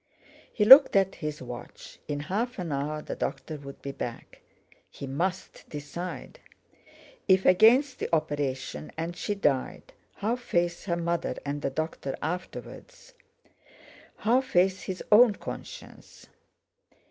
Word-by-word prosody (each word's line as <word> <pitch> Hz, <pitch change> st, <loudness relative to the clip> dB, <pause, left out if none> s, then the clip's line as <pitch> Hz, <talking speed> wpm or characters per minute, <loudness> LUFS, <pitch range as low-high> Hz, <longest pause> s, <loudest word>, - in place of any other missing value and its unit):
He 210 Hz, -, +1 dB
looked 265 Hz, +3 st, +10 dB
at 195 Hz, -1 st, +3 dB
his 150 Hz, -2 st, -4 dB
watch. 120 Hz, -1 st, -10 dB
In 145 Hz, -1 st, -3 dB
half 215 Hz, +11 st, -2 dB
an 175 Hz, -4 st, -4 dB
hour 150 Hz, +2 st, -3 dB
the -, -, -5 dB
doctor 135 Hz, +3 st, -4 dB
would 140 Hz, -1 st, -11 dB
be 140 Hz, -, -4 dB
back. 120 Hz, -3 st, -7 dB, 0.5 s
He -, -, -8 dB
must 175 Hz, +8 st, -4 dB
decide! 155 Hz, +5 st, -7 dB, 0.9 s
If 190 Hz, -1 st, +4 dB
against 245 Hz, +8 st, +5 dB
the -, -, -3 dB
operation 135 Hz, -, -2 dB
and 165 Hz, +2 st, -4 dB
she 205 Hz, -, -3 dB
died, 145 Hz, -9 st, -1 dB, 0.2 s
how 225 Hz, +4 st, -1 dB
face 175 Hz, -7 st, -1 dB
her 170 Hz, -3 st, -1 dB
mother 170 Hz, 0 st, -1 dB
and 145 Hz, +1 st, -3 dB
the 140 Hz, -, -1 dB
doctor 150 Hz, -1 st, -4 dB
afterwards? 475 Hz, -, -7 dB, 1.0 s
How 240 Hz, +4 st, +2 dB
face 190 Hz, -7 st, +1 dB
his 185 Hz, -1 st, -5 dB
own 215 Hz, 0 st, +7 dB
conscience? -, -, -10 dB
170 Hz, 130 wpm, -27 LUFS, 145-205 Hz, 1.0 s, looked